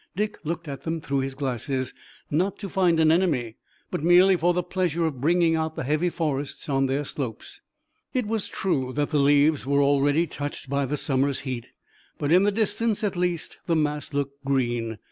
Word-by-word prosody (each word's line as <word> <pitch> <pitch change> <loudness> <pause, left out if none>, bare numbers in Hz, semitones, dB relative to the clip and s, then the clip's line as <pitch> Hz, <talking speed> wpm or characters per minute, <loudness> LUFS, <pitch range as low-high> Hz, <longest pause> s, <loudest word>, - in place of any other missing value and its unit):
Dick 210 +3 -2
looked 170 +1 -4
at 140 -2 -6
them 165 +2 -3
through 140 -3 -1
his 135 0 -3
glasses, 130 -1 -2 0.4
not 180 +7 +1
to 200 - -6
find 180 -3 +2
an 160 -1 +5
enemy, 150 -10 +1 0.3
but - - -3
merely 180 +3 +6
for 175 0 +2
the 180 0 0
pleasure 175 -2 0
of 140 -6 -3
bringing 165 +2 +3
out 160 0 -2
the - - -3
heavy 155 +6 +1
forests 145 -5 -3
on 135 -2 +1
their 140 +2 -1
slopes. 125 -6 -6 0.5
It 250 -3 0
was 220 -1 -2
true 135 -9 -1
that 145 +2 -1
the 150 - +2
leaves 145 +1 +4
were 140 0 +3
already 145 +3 +3
touched 145 -2 -6
by 140 -1 +1
the 150 +3 -2
summer's 135 0 +1
heat, 125 -4 -5 0.5
but 145 0 -1
in 180 +2 +6
the 205 +1 +3
distance 215 +1 0
at 205 -3 0
least 175 -2 -2
the 170 - +2
mass 150 -1 -1
looked 140 0 -3
green. 120 -5 -1
150 Hz, 195 wpm, -25 LUFS, 140-175 Hz, 0.5 s, merely